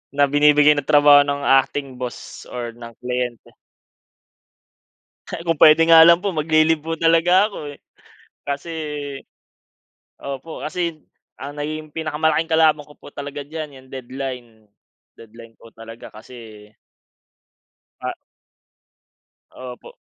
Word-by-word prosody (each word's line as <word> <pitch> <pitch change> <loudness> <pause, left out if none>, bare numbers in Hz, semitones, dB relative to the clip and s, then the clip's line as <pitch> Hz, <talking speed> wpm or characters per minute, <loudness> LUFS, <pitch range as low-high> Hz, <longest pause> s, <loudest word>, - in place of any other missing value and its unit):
na 145 - +3
binibigay 150 +1 +4
ng 145 - -2
trabaho 145 -1 +6
ng 145 0 -3
acting 135 0 +1
boss 125 -1 -8
or 120 -1 -5
ng 120 -1 -11
kliyente. 125 -1 -5 1.8
Kung 170 -1 -2
puwede 155 +2 +6
nga 165 -1 +8
lang 170 +1 +7
po, 195 0 -3
magle-leave 155 0 +2
po 165 +1 -4
talaga 165 +4 +3
ako 155 -8 -8
eh. 140 - -15 0.7
Kasi 140 +4 -5 1.5
opo, 140 +4 -7
kasi 165 -1 -4 0.3
ang 145 +2 -9
naging 155 +1 -5
pinakamalaking 160 0 -1
kalaban 155 -2 +2
ko 150 - -17
po - - -14
talaga 145 0 -7
diyan, 155 0 -8
'yang 130 0 -18
deadline 130 -1 -7 0.7
deadline 115 0 -15
po 115 - -16
talaga 115 +1 -11
kasi. 110 -2 -13 1.3
Ah. - - -4 1.4
Opo. 125 -1 -11
145 Hz, 115 wpm, -20 LUFS, 130-160 Hz, 1.8 s, nga